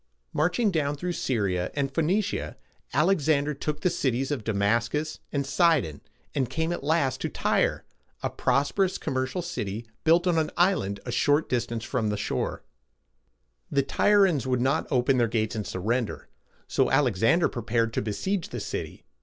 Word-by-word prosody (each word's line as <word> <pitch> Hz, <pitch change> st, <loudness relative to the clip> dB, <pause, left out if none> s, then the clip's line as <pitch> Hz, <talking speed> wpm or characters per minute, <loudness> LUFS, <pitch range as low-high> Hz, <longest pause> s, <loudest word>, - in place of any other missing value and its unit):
Marching 195 Hz, +8 st, +2 dB
down 145 Hz, -4 st, 0 dB
through 175 Hz, +5 st, -3 dB
Syr´i 105 Hz, -, 0 dB
a -, -, -3 dB
and 135 Hz, -1 st, -1 dB
Phoe 165 Hz, -, +1 dB
nic´ia, 170 Hz, -, -1 dB, 0.4 s
Alexander 150 Hz, -2 st, +2 dB
took 150 Hz, +1 st, -4 dB
the 180 Hz, -, +3 dB
cities 135 Hz, 0 st, 0 dB
of 135 Hz, -7 st, -2 dB
Da 110 Hz, -, -1 dB
mas´cus 115 Hz, +9 st, 0 dB
and 140 Hz, -1 st, -1 dB
Si´don, 135 Hz, -, +2 dB, 0.3 s
and 130 Hz, -4 st, 0 dB
came 160 Hz, +5 st, -1 dB
at 175 Hz, -, -5 dB
last 145 Hz, -3 st, +1 dB
to -, -, -1 dB
Tyre, -, -, 0 dB, 0.4 s
a -, -, 0 dB
prosperous 145 Hz, +9 st, +1 dB
commercial 130 Hz, +7 st, -2 dB
city 115 Hz, -, -4 dB, 0.2 s
built 170 Hz, +2 st, +4 dB
on 175 Hz, -3 st, +3 dB
an 155 Hz, -, 0 dB
island 175 Hz, -, +2 dB
at -, -, -9 dB
a -, -, -1 dB
short 145 Hz, +2 st, +2 dB
distance 115 Hz, -2 st, -1 dB
from 120 Hz, -4 st, -1 dB
the 105 Hz, -, -1 dB
shore. 105 Hz, -, -2 dB, 1.1 s
The 140 Hz, -, +2 dB
Tyr´i 205 Hz, +7 st, +4 dB
ans 145 Hz, -8 st, -1 dB
would 125 Hz, -1 st, +1 dB
not 135 Hz, +5 st, +1 dB
open 130 Hz, 0 st, +2 dB
their 120 Hz, -, +3 dB
gates 110 Hz, 0 st, -1 dB
and 105 Hz, -2 st, -3 dB
surrender, 115 Hz, +5 st, -2 dB, 0.4 s
so -, -, +2 dB
Alexander 135 Hz, -, +3 dB
prepared 115 Hz, -1 st, -1 dB
to -, -, 0 dB
besiege 165 Hz, -, -2 dB
the -, -, -5 dB
city. -, -, -5 dB
135 Hz, 170 wpm, -27 LUFS, 115-160 Hz, 1.1 s, built